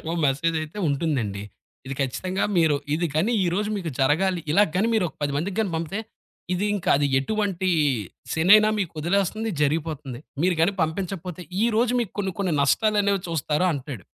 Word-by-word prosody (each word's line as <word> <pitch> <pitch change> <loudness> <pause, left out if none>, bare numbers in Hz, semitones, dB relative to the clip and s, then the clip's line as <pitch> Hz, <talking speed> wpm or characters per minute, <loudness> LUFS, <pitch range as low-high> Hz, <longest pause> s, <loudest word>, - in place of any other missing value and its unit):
ఖచ్చితంగా 160 - -8
ఒక 170 - -2
మెసేజ్ 160 +5 +1
అయితే 155 +6 -8
ఉంటుందండి. 135 -9 -1 0.4
ఇది 135 - -4
ఖచ్చితంగా 180 +9 -1
మీరు 160 -3 +4 0.2
ఇది 170 +2 0
కాని 190 +10 +2
ఈరోజు 195 +5 0
మీకు 175 -5 -3
జరగాలి 170 +7 +2
ఇలా 200 +6 +6
గాని 210 +5 +2
మీరు 215 - +2
ఒక - - -17
10 145 -1 0
మందికి 200 +7 -1
పంపితే, 170 +6 -3 0.5
ఇది 190 +3 0
ఇంకా 195 - -3
అది 145 - +2
ఎటువంటి 190 +4 -1 0.6
శేనైనా 205 +6 +6
మీకొదిలేస్తుంది 195 +5 -1
జరిగిపోతుంది. 150 -4 -2 0.2
మీరు 180 +1 +3
గాని 185 +5 +3
పంపించకపోతే, 180 +1 -4 0.2
ఈరోజు 235 +1 +2
మీకు 225 -5 -3
కొన్ని 195 -2 -1
కొన్ని 185 -4 0
నష్టాలనేవి 200 +4 +2
చూస్తారు 160 +1 0
అంటాడు. 135 - -6
175 Hz, 155 wpm, -24 LUFS, 150-200 Hz, 0.6 s, ఇలా